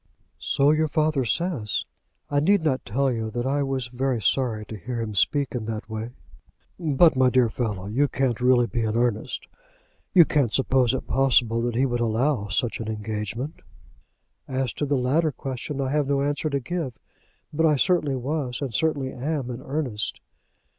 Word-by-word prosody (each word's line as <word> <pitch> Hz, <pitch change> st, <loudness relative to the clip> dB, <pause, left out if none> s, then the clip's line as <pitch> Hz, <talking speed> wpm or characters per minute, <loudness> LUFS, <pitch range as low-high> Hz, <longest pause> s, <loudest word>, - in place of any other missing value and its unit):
"So 140 Hz, +1 st, +3 dB
your 155 Hz, +1 st, +2 dB
father 155 Hz, -2 st, +1 dB
says. 125 Hz, -, -1 dB, 0.4 s
I 145 Hz, -, +1 dB
need 195 Hz, +4 st, +3 dB
not 135 Hz, -5 st, 0 dB
tell 135 Hz, +6 st, +1 dB
you 115 Hz, -2 st, -2 dB
that 120 Hz, +2 st, -3 dB
I 140 Hz, +2 st, +1 dB
was 135 Hz, -2 st, -1 dB
very 125 Hz, 0 st, -1 dB
sorry 110 Hz, 0 st, 0 dB
to 110 Hz, -, -8 dB
hear 120 Hz, +4 st, -5 dB
him 110 Hz, -2 st, -3 dB
speak 135 Hz, +9 st, +2 dB
in 120 Hz, -4 st, -3 dB
that 110 Hz, -1 st, -5 dB
way." 110 Hz, +1 st, -5 dB, 0.7 s
"But, 160 Hz, -1 st, +4 dB
my 130 Hz, -1 st, +4 dB
dear 125 Hz, -2 st, +3 dB
fellow, 105 Hz, -5 st, -3 dB
you 125 Hz, +8 st, +1 dB
can't 130 Hz, -4 st, -1 dB
really 125 Hz, -1 st, +4 dB
be 120 Hz, 0 st, -2 dB
in 110 Hz, 0 st, 0 dB
earnest? 120 Hz, -3 st, -1 dB, 0.6 s
You 175 Hz, -3 st, +7 dB
can't 140 Hz, -8 st, +1 dB
suppose 130 Hz, -1 st, +2 dB
it -, -, -4 dB
possible 120 Hz, -3 st, +3 dB
that 120 Hz, -1 st, -1 dB
he 130 Hz, +3 st, +3 dB
would 120 Hz, -2 st, -1 dB
allow 115 Hz, 0 st, +1 dB
such 110 Hz, +5 st, -1 dB
an 110 Hz, -, -5 dB
engagement?" 110 Hz, -, -4 dB, 0.9 s
"As 130 Hz, -2 st, -1 dB
to 145 Hz, -, -2 dB
the 140 Hz, 0 st, +1 dB
latter 150 Hz, +6 st, +2 dB
question, 135 Hz, +1 st, -5 dB
I 135 Hz, -1 st, -1 dB
have 150 Hz, -1 st, +1 dB
no 140 Hz, 0 st, +1 dB
answer 145 Hz, +2 st, -1 dB
to 140 Hz, -1 st, 0 dB
give; 140 Hz, -2 st, -4 dB, 0.6 s
but 160 Hz, +2 st, +3 dB
I 150 Hz, -, +4 dB
certainly 150 Hz, -1 st, +2 dB
was, 130 Hz, -1 st, -3 dB
and 135 Hz, -5 st, -4 dB
certainly 140 Hz, 0 st, 0 dB
am 135 Hz, -1 st, -3 dB
in 120 Hz, +1 st, -6 dB
earnest." 130 Hz, -7 st, -3 dB
130 Hz, 180 wpm, -25 LUFS, 115-145 Hz, 0.9 s, You